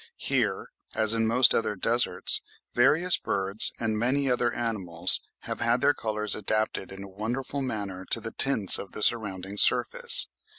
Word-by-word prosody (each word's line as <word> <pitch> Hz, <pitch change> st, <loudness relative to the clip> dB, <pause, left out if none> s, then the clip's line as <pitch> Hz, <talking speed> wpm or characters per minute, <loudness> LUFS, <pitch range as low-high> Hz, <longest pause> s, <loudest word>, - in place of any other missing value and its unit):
Here, -, -, -3 dB, 0.2 s
as 110 Hz, 0 st, +3 dB
in 115 Hz, -1 st, 0 dB
most 120 Hz, +2 st, +4 dB
other 105 Hz, -, -1 dB
deserts, 120 Hz, +5 st, 0 dB, 0.3 s
various 155 Hz, +9 st, +2 dB
birds, 100 Hz, +2 st, +3 dB
and 110 Hz, -2 st, -2 dB
many 130 Hz, +3 st, -1 dB
other 120 Hz, -1 st, 0 dB
animals, 95 Hz, -8 st, +2 dB, 0.2 s
have -, -, -7 dB
had 120 Hz, +2 st, 0 dB
their 145 Hz, -, +2 dB
colours 105 Hz, -4 st, -4 dB
adapted 110 Hz, -1 st, -3 dB
in 95 Hz, 0 st, -10 dB
a -, -, -10 dB
wonderful 120 Hz, +8 st, -4 dB
manner 100 Hz, -7 st, -6 dB
to -, -, +1 dB
the 115 Hz, 0 st, -8 dB
tints 115 Hz, -9 st, +3 dB
of 100 Hz, -, -10 dB
the 105 Hz, -, -2 dB
surrounding 100 Hz, -4 st, -1 dB
surface. -, -, +3 dB
110 Hz, 160 wpm, -25 LUFS, 100-120 Hz, 0.3 s, most